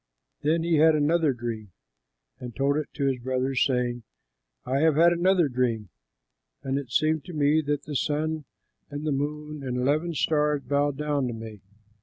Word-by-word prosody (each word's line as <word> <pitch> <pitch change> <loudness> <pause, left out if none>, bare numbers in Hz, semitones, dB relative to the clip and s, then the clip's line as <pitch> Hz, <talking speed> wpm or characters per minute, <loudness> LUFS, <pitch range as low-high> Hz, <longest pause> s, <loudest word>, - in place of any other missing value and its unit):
Then 160 +3 +1
he 170 -1 +2
had 160 +1 +5
another 155 +1 +2
dream 115 -5 -6 0.7
and 120 -2 -8
told 140 +1 +1
it 150 -1 -2
to 140 - -1
his 135 -2 0
brothers, 130 +1 0
saying, 125 -2 0 0.6
"I 135 +2 0
have 160 0 +3
had 170 +2 +5
another 175 -1 +3
dream, 120 -6 -1 0.7
and 135 +1 -1
it 135 -4 -8
seemed 155 +3 +1
to 180 - -8
me 150 +1 +3
that 145 -1 0
the 150 - -6
sun 155 +2 -1 0.4
and 145 +1 -6
the 155 - 0
moon 150 +1 -3
and 125 -2 -3
eleven 150 +6 0
stars 150 -1 +1
bowed 145 -1 0
down 145 -3 0
to 120 - -3
me." 110 -2 -9
145 Hz, 175 wpm, -26 LUFS, 130-155 Hz, 0.7 s, had